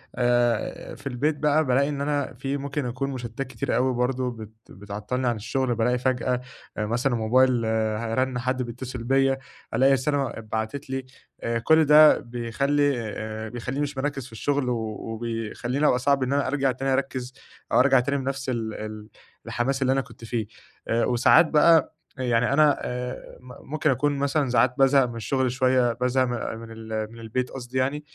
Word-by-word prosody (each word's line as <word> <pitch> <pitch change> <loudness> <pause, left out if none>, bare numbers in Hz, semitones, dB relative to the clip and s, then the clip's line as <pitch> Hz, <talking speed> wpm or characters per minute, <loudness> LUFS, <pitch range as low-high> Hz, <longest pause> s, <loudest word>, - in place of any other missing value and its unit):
آآ، 120 -2 0
في - - -8
البيت 145 +4 0
بقى 150 +1 +2
بالاقي 135 +3 +2
إن 140 -1 -3
أنا 145 -2 -1
في 135 +3 -3
ممكن 140 0 -3
أكون 130 +3 -3
مشتتات 125 +1 -5
كتيرة 120 -4 -3
أوي 130 +1 +2
برضه 125 +1 0
بت 110 -2 -9 0.2
بتعطّلني 105 +6 -4
عن 120 - +1
الشغل 125 +3 -1
بالاقي 125 +2 +1
فجأة 125 0 0 0.4
مثلًا 120 +4 0
موبايل 120 +1 +3
ه 110 0 -1
رَن 130 0 0
حد 125 +1 -1
بيتصل 120 0 -6
بيَّ، 135 +1 +3 0.4
ألاقي 135 +4 +4
رسالة 135 -1 0
اتبعتت 110 +5 -5
لي، 135 -1 -3 0.4
آآ، 115 0 0
كل 160 +5 +4
ده 150 +1 +7
بيخلّي 135 +4 0 0.2
آآ 110 0 -5
بيخلّيني 125 +4 -4
مش 145 -1 -4
مركّز 135 -2 -2
في 130 - -13
الشغل 135 +3 -1
و 120 - +1 0.3
وبيخلّيني 115 +4 -2
أبقى 125 - +3
صعب 140 0 +2
إن 130 - -1
أنا 140 -2 +1
أرجَع 135 -1 +1
تاني 135 +2 -1
أركّز، 130 -2 -2 0.4
أو - - +4
أرجَع 135 0 +5
تاني 140 +3 0
بنَفْس 135 0 -3
ال 115 -3 -2
ال 110 0 -7 0.4
الحماس 135 +3 -1
اللي 130 0 +3
أنا 135 - +1
كنت 115 - -15
فيه. 110 -2 -2 0.4
آآ 115 +1 +1
وساعات 125 +6 +5
بقى 160 +1 +4 0.2
يعني 125 0 +1
أنا 150 0 +4
آآ 125 +1 -5
م 125 +1 -14
ممكن 155 0 +1
أكون 145 +2 +1
مثلًا 140 0 0
ساعات 120 +1 +3
بازهق 135 0 +5
من 120 -1 -6
الشغل 130 +3 0
شوية 130 -2 +2
بازهق 125 +2 +1 0.3
من 115 0 -10
ال 110 -1 -5
من 115 - -12
البيت 120 +3 -3
قصدي 125 -1 -6
يعني؛ 150 +1 -6
125 Hz, 175 wpm, -25 LUFS, 115-135 Hz, 0.4 s, ده